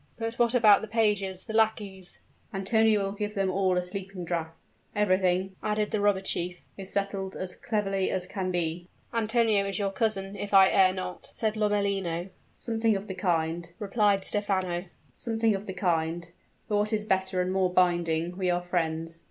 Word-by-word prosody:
"But 225 0 -4
what 240 +1 +3
about 215 -4 +6
the 220 - -5
pages, 205 -4 0
the 220 - -7
lackeys 210 -4 0 0.2
" - - -35
"Antonio 215 +1 +3
will 195 - -2
give 210 +1 -4
them 195 -1 +1
all 185 -1 +1
a 180 - +1
sleeping 185 0 -5
draught. 165 -1 -3 0.4
Everything," 190 -2 +2
added 210 0 -1
the 215 - 0
robber 205 -2 +3
chief, 180 -2 -1 0.2
"is 195 -1 -6
settled 195 -1 -2
as 185 -1 -5
cleverly 195 -4 -1
as 185 -1 -2
can 185 -1 -3
be." 175 -1 -2 0.3
"Antonio 225 -2 +2
is 195 -2 -2
your 200 -1 0
cousin, 195 -2 -1
if 205 0 -2
I 190 -1 +8
err 190 -1 +5
not?" 185 -1 -6
said 220 -1 -1
Lomellino. 200 -4 0 0.2
"Something 225 -2 0
of 195 +1 -4
the 190 - -5
kind," 170 -2 -1
replied 205 -1 +2
Stephano; 190 -3 -1 0.3
"but 190 -5 -2
what 210 +1 +1
is 210 -1 0
better 190 -2 0
and 180 +1 0
more 190 -1 +2
binding 175 -1 +1
we 185 -1 -1
are 175 0 0
friends. 165 -2 -2
195 Hz, 170 wpm, -28 LUFS, 180-210 Hz, 0.4 s, I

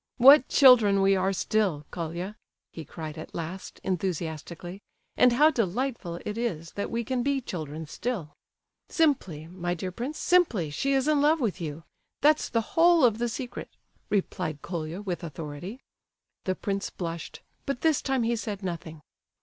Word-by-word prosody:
"What 270 +2 +8
children 230 -8 +7
we 195 0 +5
are 190 +1 +1
still, 190 -6 0
Colia!" 175 +4 -4 0.4
he 165 - -7
cried 155 0 -7
at - - -9
last, 175 +3 -6
enthusiastically,—"and 175 - -2
how 300 +6 +5
delightful 230 - -2
it 210 +2 -3
is 165 -9 -3
that 200 - -4
we 235 0 -2
can 250 +2 -1
be 275 +2 +1
children 160 - -6
still!" 170 -2 -4 0.6
"Simply—my 175 - 0
dear 185 +2 -4
prince,—simply 245 - +1
she 275 - 0
is 270 +1 +2
in 300 -2 +3
love 310 +3 +4
with 215 -8 -1
you,—that's 165 - -1
the 230 - +1
whole 335 -3 +6
of 225 -2 +2
the 240 0 0
secret!" 245 +1 -6 0.4
replied 180 -6 -2
Colia, 170 +2 -4
with 180 -4 -4
authority. 160 - -7 0.7
The 185 - 0
prince 200 0 -3
blushed, 170 -2 -6 0.3
but 275 -2 -2
this 320 -3 +3
time 265 -3 0
he 235 +1 +1
said 210 -3 -5
nothing. 160 -4 -6
195 Hz, 150 wpm, -27 LUFS, 170-250 Hz, 0.7 s, What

